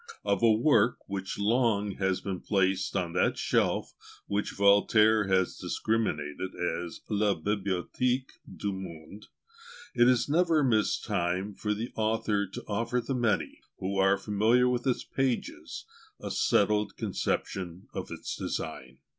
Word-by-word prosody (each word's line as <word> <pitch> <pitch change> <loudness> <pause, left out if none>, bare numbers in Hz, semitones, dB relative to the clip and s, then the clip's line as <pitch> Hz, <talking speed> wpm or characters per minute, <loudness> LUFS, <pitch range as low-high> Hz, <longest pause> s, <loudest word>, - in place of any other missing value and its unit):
Of - - +1
a 115 -1 +6
work 115 0 +3
which 95 -1 -4
long 105 -1 +2
has 95 -1 0
been 95 -2 -4
placed 95 -1 0
on 90 -3 -1
that 90 - +1
shelf - - 0 0.3
which 100 +1 -1
Voltaire 105 +1 +4
has 95 -1 +1
discriminated 95 -6 -2
as 85 0 -3
la 105 -2 +1
Bibliothèque 105 +8 -1 0.2
du 100 -1 -3
Monde, 95 +1 -9 0.7
it 120 -1 +5
is 125 -2 +3
never 160 0 +3
mistimed 100 -5 0
for 105 -1 -1
the 115 +4 -5
author 110 -2 0
to 95 - -8
offer 115 +4 -1
the 135 - -3
many, 120 -5 0 0.2
who 95 +1 -2
are 95 +1 +4
familiar 110 +5 +2
with 125 +1 0
its 125 - 0
pages, 135 -3 -3 0.3
a - - -5
settled 105 +1 +2
conception 90 -1 -3
of - - -5
its - - -5
design. 65 0 -5
105 Hz, 135 wpm, -29 LUFS, 95-115 Hz, 0.7 s, a